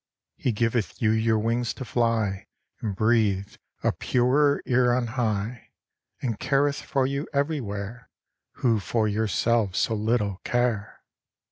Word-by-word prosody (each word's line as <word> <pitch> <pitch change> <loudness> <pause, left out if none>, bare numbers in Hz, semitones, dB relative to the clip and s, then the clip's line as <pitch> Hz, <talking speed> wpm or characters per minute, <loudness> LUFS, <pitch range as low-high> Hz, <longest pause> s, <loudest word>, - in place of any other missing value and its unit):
"He 125 - -1
giveth 115 -3 -1
you 110 -2 +3
your 110 0 +2
wings 115 +2 0
to 130 - -6
fly 115 -5 0 0.3
And 105 -3 -3
breathe 105 -3 +2 0.3
a - - +3
purer 140 +4 +2
air 125 -1 +3
on 125 -1 0
high, 115 -1 -2 0.5
And 115 -5 -2
careth 140 +1 +1
for 135 -3 0
you 140 +3 -2
everywhere, 120 -7 -3 0.4
Who 115 -4 +1
for 110 +2 0
yourselves 105 0 +1
so 115 - +2
little 105 -2 0
care!" 120 -4 -1
115 Hz, 130 wpm, -26 LUFS, 105-125 Hz, 0.5 s, you